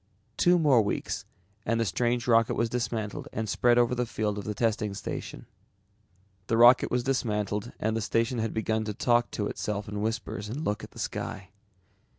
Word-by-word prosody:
Two 175 0 +4
more 145 -8 +5
weeks 105 - -3 0.4
and 115 +2 0
the 115 - +2
strange 120 +5 0
rocket 115 -1 +4
was 115 0 0
dismantled 115 -3 -3
and 110 0 -3
spread 120 +3 +3
over 120 0 +3
the 125 -1 -1
field 105 -2 -2
of 100 - -7
the 105 - -3
testing 105 -2 0
station. - - -6 1.0
The 115 - +1
rocket 120 +2 +7
was 125 0 0
dismantled 105 -4 -1
and 110 +1 0
the 115 - -1
station 115 +3 0
had 110 0 -1
begun 110 0 -1
to 105 -1 -4
talk 120 +1 +2
to 105 - -3
itself 105 0 -3
in 105 0 -4
whispers 105 -2 -3
and 145 +7 -4
look 105 - -1
at - - -8
the - - -17
sky. 95 -1 -5
115 Hz, 185 wpm, -28 LUFS, 105-120 Hz, 1.0 s, rocket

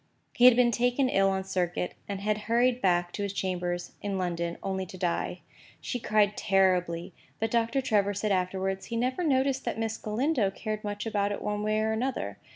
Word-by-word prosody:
He 245 - +4
had 250 -2 +9
been 245 -1 +4
taken 245 +3 +2
ill 195 -3 +3
on 190 0 -1
circuit, 180 -2 -2 0.2
and 200 -1 -3
had 210 +1 +1
hurried 245 +2 +3
back 175 -2 +2
to 205 - -5
his 200 -1 -2
chambers 175 -2 -2
in 200 -1 -2
London 170 -2 -2
only 190 -1 -2
to 185 - -10
die. 175 -2 -2 0.4
She 245 - -4
cried 210 -2 +2
terribly; 180 -3 +1 0.3
but 225 0 -1
Doctor 235 +3 +1
Trevor 205 -5 +1
said 210 +1 -1
afterwards, 190 +1 -1
he 230 - -4
never 255 +8 0
noticed 270 -3 +1
that - - -2
Miss 225 0 -2
Galindo 230 0 +1
cared 215 +2 -5
much 205 +1 -4
about 205 -2 0
it 205 - -4
one 210 0 -2
way 215 0 +1
or 220 0 +1
another. 220 - -2
205 Hz, 195 wpm, -28 LUFS, 190-230 Hz, 0.4 s, had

